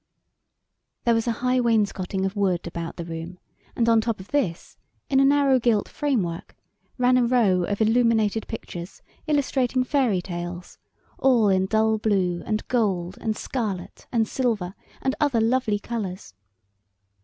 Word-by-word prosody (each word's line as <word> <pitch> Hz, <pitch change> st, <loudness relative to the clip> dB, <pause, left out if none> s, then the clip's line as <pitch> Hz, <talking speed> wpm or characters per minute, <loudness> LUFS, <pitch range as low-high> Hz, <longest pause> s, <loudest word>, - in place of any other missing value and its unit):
There 235 Hz, -, +3 dB
was 225 Hz, +1 st, 0 dB
a -, -, +3 dB
high 255 Hz, 0 st, +3 dB
wainscoting 200 Hz, -5 st, 0 dB
of 195 Hz, +2 st, -3 dB
wood 190 Hz, -4 st, 0 dB
about 170 Hz, -1 st, -5 dB
the 170 Hz, -, -6 dB
room, 165 Hz, +2 st, -7 dB, 0.4 s
and 235 Hz, -, +1 dB
on 230 Hz, -1 st, +5 dB
top 225 Hz, -2 st, -2 dB
of 190 Hz, -, -11 dB
this, 205 Hz, -13 st, -2 dB, 0.4 s
in 270 Hz, -, +4 dB
a -, -, +5 dB
narrow 275 Hz, -1 st, +4 dB
gilt 230 Hz, -4 st, +2 dB
framework, 205 Hz, -, -2 dB, 0.4 s
ran 250 Hz, 0 st, +4 dB
a -, -, +3 dB
row 220 Hz, -8 st, +3 dB
of 205 Hz, +3 st, -2 dB
illuminated 225 Hz, -1 st, +2 dB
pictures, 175 Hz, +2 st, -8 dB, 0.2 s
illustrating 265 Hz, -4 st, +1 dB
fairy 255 Hz, -7 st, +1 dB
tales, 175 Hz, -1 st, -6 dB, 0.4 s
all 240 Hz, -6 st, +4 dB
in 190 Hz, 0 st, +2 dB
dull 220 Hz, +1 st, +2 dB
blue 185 Hz, -5 st, +1 dB
and 215 Hz, -1 st, -2 dB
gold 195 Hz, -7 st, 0 dB
and 220 Hz, -2 st, -1 dB
scarlet 210 Hz, -8 st, -4 dB
and 225 Hz, -3 st, +1 dB
silver 220 Hz, -8 st, -1 dB, 0.3 s
and 265 Hz, -, +1 dB
other 280 Hz, -6 st, +2 dB
lovely 225 Hz, -1 st, +1 dB
colors. 205 Hz, -, -5 dB
220 Hz, 150 wpm, -24 LUFS, 185-245 Hz, 0.4 s, on